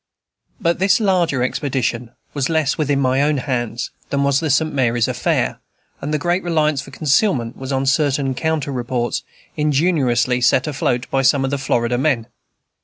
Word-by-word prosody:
But 170 -5 0
this 195 +4 +3
larger 175 - +1
expedition 125 -3 -2 0.2
was 140 0 -1
less 160 -4 +1
within 145 -2 0
my 130 0 +2
own 145 0 +2
hands 125 -3 -3 0.2
than 140 0 0
was 140 0 +2
the 160 - -2
St. 155 +3 +1
Mary's 120 -4 +1
affair, - - -1 0.4
and 145 - -4
the 155 - +1
great 175 +5 0
reliance 155 -5 +1
for - - -11
concealment 140 - +1
was 130 +1 -6
on 135 0 0
certain 140 -1 +1
counter 155 0 -1
reports, 120 -1 -2 0.3
ingeniously 140 -5 +1
set 130 +1 +3
afloat 135 -4 -1
by 135 - +2
some 135 0 +3
of 135 - -2
the 140 - -1
Florida 120 -2 0
men. 130 -5 +1
140 Hz, 170 wpm, -19 LUFS, 125-155 Hz, 0.4 s, this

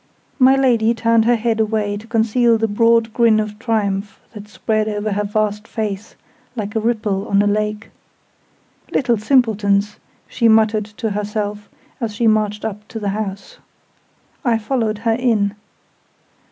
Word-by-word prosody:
My 260 +1 +6
Lady 235 -4 +2
turned 230 0 +2
her 240 +1 +4
head 225 0 -1
away 215 -2 0
to 210 +2 -9
conceal 230 +1 +2
the 225 0 0
broad 230 +1 +2
grin 230 -2 +4
of 215 0 -4
triumph 210 -3 -2
that 210 -1 -10
spread 215 0 -1
over 210 0 -2
her 205 +1 -1
vast 210 +1 -2
face, 210 -1 -5 0.4
like 210 -1 -5
a - - +2
ripple 215 -3 -1
on 200 - +2
a - - 0
lake. 210 +1 -1 1.0
"Little 240 -4 +1
simpletons!" 210 -4 +2 0.3
she 235 - +1
muttered 220 -1 +3
to 215 +1 -5
herself, 210 0 -4 0.3
as 225 -4 -3
she 235 - 0
marched 215 -1 +1
up 210 -1 -6
to 225 - -7
the 205 -2 -2
house. 200 -1 -5 0.8
I 235 -3 +2
followed 225 -1 -1
her 225 +1 0
in. 225 -4 +1
215 Hz, 155 wpm, -19 LUFS, 210-230 Hz, 1.0 s, My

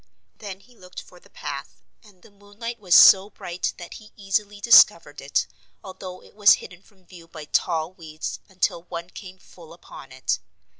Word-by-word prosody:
Then 200 -2 -9
he 245 +4 -23
looked 180 -4 -12
for - - -15
the - - -23
path - - -8 0.2
and 200 -5 -22
the - - -19
moonlight 205 +4 -9
was 180 -4 +2
so 195 +1 +8
bright 175 -3 -5
that 175 - -10
he 215 -1 -14
easily 205 0 -2
discovered 170 -8 +5
it, 140 +1 -1 0.4
although 185 -1 -10
it - - -19
was 205 -1 +6
hidden 180 0 -7
from 195 -2 -27
view 170 -2 -15
by 155 -2 -11
tall 160 +2 -1
weeds 160 -3 -7
until 185 -2 -2
one 170 0 -8
came 185 -2 -11
full 170 -3 -16
upon 170 - -14
it. - - -2
185 Hz, 180 wpm, -23 LUFS, 170-205 Hz, 0.4 s, so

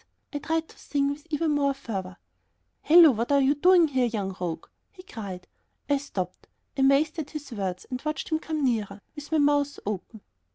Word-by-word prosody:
I 290 - -2
tried 320 +2 -1
to - - -18
sing 280 -1 0
with 295 +3 -8
even 315 +1 0
more 280 -2 +1
fervor. 190 -8 -6 0.6
"Hello, 330 -1 +8
what 235 +2 -2
are 280 - +5
you 275 +1 +4
doing 350 +3 +5
here, 260 -3 +2
young 200 -5 -3
rogue?" 170 -2 -3 0.3
he 365 -2 -14
cried. 195 - -8 0.5
I 285 - +4
stopped, 185 -10 -5 0.3
amazed 275 +4 +3
at 300 - -4
his 295 -3 -8
words, 190 -5 -4
and 255 -1 -5
watched 305 0 -3
him 315 -1 +1
coming 315 -2 -3
nearer, 210 -5 -1
with 295 0 -9
my 320 - +3
mouth 290 -1 +2
open. 210 +2 -5
280 Hz, 190 wpm, -26 LUFS, 215-305 Hz, 0.6 s, Hello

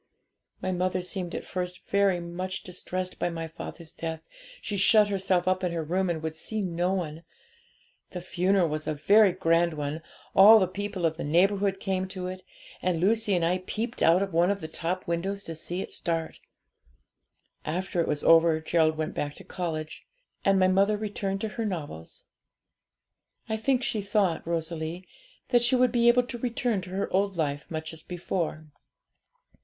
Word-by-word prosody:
'My 185 - 0
mother 185 0 0
seemed 180 -1 -2
at - - -5
first 180 -1 -5
very 200 -3 +2
much 180 +2 -5
distressed 185 0 -5
by - - 0
my 165 -1 -4
father's 160 0 -9
death; 160 -2 -5 0.4
she 205 - -4
shut 210 +2 +5
herself 185 -2 0
up 185 0 +1
in 180 - 0
her 165 -1 -2
room, 185 +4 0
and 160 -2 -2
would 160 0 -3
see 215 +7 -4
no 175 0 0
one. 165 -4 -3 0.9
The 180 - -6
funeral 185 +1 +2
was 155 0 -4
a 155 - -1
very 200 +7 +5
grand 170 -2 +2
one; 150 +2 -3 0.3
all 205 +4 +9
the 190 -4 +3
people 190 -1 -3
of 160 -1 0
the - - -4
neighbourhood 195 +5 +2
came 190 -1 -1
to 185 -1 -6
it, 185 0 -5 0.4
and 180 -3 0
Lucy 210 +2 +2
and 170 -2 +1
I 180 +2 +1
peeped 220 +6 -4
out 170 +4 +5
of 195 -3 -5
one 170 +2 +4
of 200 0 0
the 160 - -6
top 170 +3 -3
windows 190 +4 -2
to 165 - -5
see 175 +3 -4
it - - -7
start. 165 -2 -3 1.2
After 180 +2 -1
it - - -1
was 150 -1 -1
over, 165 -1 +6
Gerald 160 0 +2
went 155 0 -2
back 145 0 -3
to - - -11
college, 155 -4 -5 0.4
and 195 0 +4
my 185 -1 +4
mother 195 +3 +3
returned 200 -2 -3
to 220 - -1
her 230 - 0
novels. 150 - -6 1.2
I 220 - -1
think 255 +3 +1
she 215 - -1
thought, 200 -5 0
Rosalie, 165 +1 -3 0.4
that 240 -2 +4
she 240 +2 +3
would 250 -1 +4
be 235 -1 +3
able 245 +1 +6
to 240 0 -7
return 235 -3 -1
to 185 - -10
her 190 +2 -2
old 195 -1 +1
life 145 -2 -2
much 160 0 -5
as 160 - -7
before. 175 -3 -3
180 Hz, 185 wpm, -27 LUFS, 165-195 Hz, 1.2 s, all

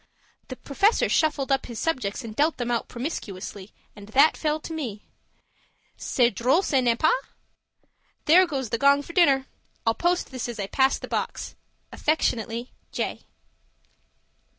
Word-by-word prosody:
The 255 - -6
Professor 395 - +2
shuffled 295 -3 +1
up 270 -1 +1
his 235 -2 -7
subjects 255 -8 -2
and 220 -2 -8
dealt 300 +5 +2
them 245 -1 -2
out 235 - -1
promiscuously, 210 - -6 0.2
and 205 -1 -12
that 280 +7 +5
fell 305 0 -1
to 325 - -7
me. 235 -10 -5 0.9
C'est 245 -2 +1
drole 255 - +2
ca 270 -7 +2
n'est 240 -2 +2
pas? 315 - +4 1.1
There 360 +4 +6
goes 270 -7 -3
the 230 - 0
gong 280 +1 +4
for 335 - -10
dinner. 275 -7 +4 0.4
I'll 225 - +3
post 345 +7 0
this 255 -2 -4
as 235 -2 -6
I 200 - -1
pass 265 +6 +2
the - - -8
box. - - -3 0.4
Affectionately, 235 -6 -1 0.2
J. - - -4
265 Hz, 150 wpm, -25 LUFS, 230-310 Hz, 1.1 s, There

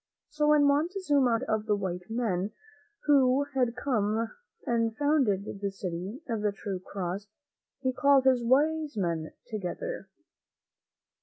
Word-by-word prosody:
So 300 0 0
when 300 -1 +5
Montezuma 290 -2 +2
heard 230 +1 +1
of 220 -4 -1
the 210 - +3
white 180 -2 -4
men, 215 -4 -1 0.5
who 275 -2 +4
had 250 -3 +1
come 225 -3 0 0.3
and 230 -2 0
founded 275 -10 +2 0.2
the 200 - 0
City 195 - -5
of 225 -4 -2
the 210 -1 +1
True 195 -1 -5
Cross, 190 +1 -5 0.5
he 260 -1 0
called 275 +1 +4
his 255 -2 +4
wise 295 +2 +2
men 170 -4 -1
together. 220 - -5
235 Hz, 135 wpm, -29 LUFS, 200-280 Hz, 0.5 s, when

